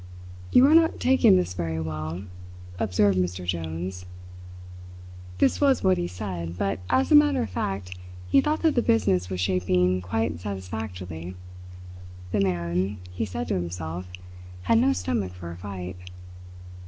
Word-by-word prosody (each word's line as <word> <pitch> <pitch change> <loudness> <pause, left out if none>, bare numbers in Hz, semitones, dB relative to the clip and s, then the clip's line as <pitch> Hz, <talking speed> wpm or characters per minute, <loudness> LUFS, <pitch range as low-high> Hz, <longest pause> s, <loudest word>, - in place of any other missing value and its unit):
"You 255 - +7
are 295 - +5
not 325 0 +4
taking 260 - +5
this 90 0 -1
very 80 -2 -3
well," 80 +2 -4 0.6
observed 100 -1 +2
Mr. 90 0 -2
Jones. 90 +1 -4 1.3
This - - +2
was 275 -2 +3
what 95 -1 +3
he 85 - -1
said, 90 -2 -5
but 100 0 -1
as 265 +4 +2
a - - +8
matter 295 - +5
of 105 - -6
fact 90 0 -3 0.3
he 270 - +5
thought 305 +3 -1
that 320 -2 +4
the 240 - +2
business 90 - +2
was 95 -1 -3
shaping 90 0 +1
quite 90 -2 -2
satisfactorily. 90 -3 -6 1.0
The 105 - +1
man, 90 +1 0
he 90 +5 -2
said 80 -5 -4
to - - +1
himself, 85 0 -4 0.6
had 110 +5 +4
no 90 - +4
stomach 90 +1 -2
for 85 -2 -8
a 85 - -8
fight. 90 -1 -7
90 Hz, 150 wpm, -25 LUFS, 90-100 Hz, 1.3 s, a